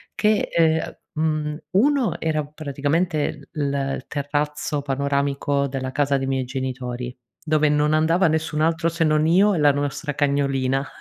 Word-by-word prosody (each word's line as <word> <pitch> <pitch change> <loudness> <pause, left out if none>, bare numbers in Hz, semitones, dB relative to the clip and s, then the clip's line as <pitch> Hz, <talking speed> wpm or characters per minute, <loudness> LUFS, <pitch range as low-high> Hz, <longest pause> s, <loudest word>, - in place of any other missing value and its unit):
che, 215 0 +2
ehm, 160 -1 +3
a - - -11 0.2
mhmm, 155 -1 -1
uno 260 +5 +2
era 155 -2 0
praticamente, 150 +1 -2
l 155 - -4
il 135 -1 -2
terrazzo 145 +1 -2
panoramico 140 0 0
della 130 -1 -4
casa 140 0 +1
dei 135 0 -3
miei 135 -1 -1
genitori, 125 -1 -4 0.3
dove 155 -1 +2
non 150 +1 +2
andava 165 +4 +3
nessun 160 -1 -1
altro 165 +1 +1
se 165 0 -1
non 155 0 +3
io 195 +5 +4
e - - 0
la 145 -1 +5
nostra 145 +2 -2
cagnolina. 140 -2 0
150 Hz, 155 wpm, -23 LUFS, 140-160 Hz, 0.3 s, la